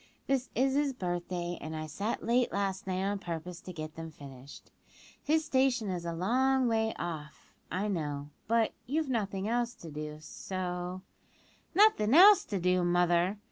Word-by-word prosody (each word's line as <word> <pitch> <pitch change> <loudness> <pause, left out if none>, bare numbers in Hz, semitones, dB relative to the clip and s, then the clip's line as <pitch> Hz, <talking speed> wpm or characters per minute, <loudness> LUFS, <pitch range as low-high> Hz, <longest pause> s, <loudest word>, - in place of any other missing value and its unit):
This 265 -2 0
is 265 +2 +2
his 285 -1 +1
birthday, 175 -3 -3
and 160 +1 -5
I 155 0 -4
sat 200 +9 -3
late 240 +2 +2
last 195 -1 -2
night 185 0 -1
on 200 +1 -1
purpose 170 -1 -6
to 185 - -8
get 155 -2 -6
them 165 0 -7
finished. 140 -3 -12 0.5
His 315 +1 +1
station 260 -7 +2
is 175 -2 -4
a 170 - -2
long 255 +9 +2
way 220 -1 +1
off, 155 -3 -7 0.2
I 195 +3 -1
know, 150 -6 -3 0.2
but 230 -1 +2
you've 300 +2 0
nothing 200 -4 -1
else 240 +1 0
to 165 -7 -10
do, 150 0 -6
so 180 +3 -5 0.4
" - - -33
"Nothin' 360 - +5
else 400 +4 +8
to 200 -4 -2
do, 180 0 +2
mother!" 175 +2 +2
190 Hz, 170 wpm, -31 LUFS, 170-240 Hz, 0.5 s, else